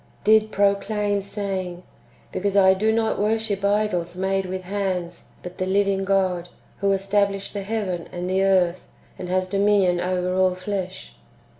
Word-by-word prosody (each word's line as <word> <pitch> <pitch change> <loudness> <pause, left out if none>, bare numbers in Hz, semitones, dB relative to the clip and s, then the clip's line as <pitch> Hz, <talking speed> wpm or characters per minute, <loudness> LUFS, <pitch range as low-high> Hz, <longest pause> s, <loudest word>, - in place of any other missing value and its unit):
"^ - - -30
did 215 +1 +4
proclaim, 205 0 +1
saying, 190 -3 -4 0.2
" - - -31
Because 200 +1 -1
I 190 -1 +7
do 215 +4 +1
not 220 0 0
worship 210 -1 0
idols 200 -4 0
made 190 0 0
with 185 0 -4
hands, 185 -3 -3 0.2
but 180 0 -9
the 185 - -1
living 195 0 +1
God, 185 -3 0 0.3
who 200 0 +2
established 195 0 0
the 200 - -3
heaven 195 -4 -3
and 175 0 -4
the 190 +1 +1
earth, 185 -2 +2 0.3
and 180 - -5
has 185 0 0
dominion 195 -2 +2
over 180 0 -1
all 185 0 +2
flesh." 185 0 -5
195 Hz, 160 wpm, -23 LUFS, 185-205 Hz, 0.3 s, I